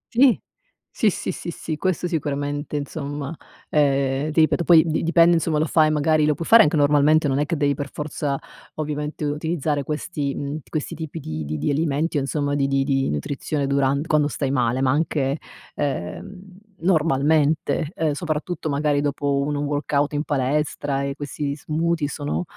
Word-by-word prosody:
Sì. 250 0 +5 0.6
Sì, 220 - +3
sì, - - -3
sì, - - -6
sì, 160 -1 -5
questo 180 0 -1
sicuramente, 145 -2 -3
insomma, 145 +1 -5 0.3
eh, 140 -1 +1
ti 160 - +3
ripeto 160 +2 +2
poi 165 -2 +7
di 160 -2 0
dipende 170 +1 +5
insomma, 165 -1 0
lo 155 - +2
fai, 155 0 +3
magari, 155 0 +2
lo 150 - +2
puoi 165 - -5
fare 230 0 +8
anche 150 - +1
normalmente 150 +1 +4
non 135 0 +1
è 145 - 0
che 165 0 -1
devi 145 -1 +2
per 140 0 -5
forza, 145 -2 -3 0.4
ovviamente 150 0 -3
utilizzare 150 0 -1
questi, 150 -1 -3
uhm, 145 +2 -4
questi 155 -2 -3
tipi 160 0 -6
di 80 - -5
di 75 +2 -3
di 75 - 0
alimenti 155 +1 0
o - - +3
insomma 145 +1 -1
di 140 -1 +1
di 135 0 +1
di 135 -1 +1
nutrizione 140 - -2
duran 140 +1 +1
quando 150 -2 +2
stai 135 -1 -2
male. 125 -1 +1
Ma 130 - +3
anche, 145 -1 0 0.4
ehm, 145 - -4 0.4
normalmente, 155 -2 +2
ehm, 160 -2 0
soprattutto 155 +1 -3
magari 145 0 +1
dopo 145 -1 0
un 145 +1 -1
workout 145 0 0
in 145 0 0
palestra 145 0 -1
e 140 0 -3
questi 145 0 -4
smoothie 160 +1 -1
sono, 145 +4 -3
145 Hz, 175 wpm, -23 LUFS, 140-155 Hz, 0.6 s, fare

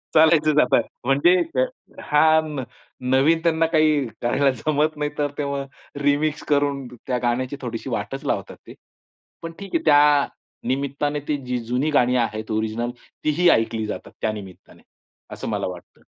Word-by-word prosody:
चालायचंच 155 -1 +5
आता, 125 - +4 0.2
म्हणजे 140 +7 +4 0.7
हा 150 +1 +3 0.9
नवीन 145 +5 +4
त्यांना 165 -1 +2
काही 155 -4 +3
करायला 135 +3 +2
जमत 150 +5 0
नाहीतर, 150 -1 -2
तेव्हा 140 -1 -2 0.4
रिमिक्स 145 +2 +1
करून 140 -2 +1 0.2
त्या 125 -1 0
गाण्याची 125 +3 0
थोडीशी 120 -3 -5
वाटच - - -4
लावतात - - -2
ते. - - -10 0.7
पण 165 - -6
ठीक 200 +7 -6
आहे, 325 - +1
त्या 145 -1 +5 0.4
निमित्ताने, 140 +2 -1
ती 150 - 0
जी 125 0 -1
जुनी 125 +6 0
गाणी 125 -3 +3
आहेत 110 0 -6
ओरिजिनल 110 +2 -1 0.3
तीही 165 +4 +3
ऐकली 115 -5 +2
जातात, - - -6
त्या 110 - +1
निमित्ताने, 100 -4 -11 0.5
असं - - -5
मला - - -1
वाटतं. 90 -1 -10
140 Hz, 140 wpm, -23 LUFS, 125-150 Hz, 0.9 s, चालायचंच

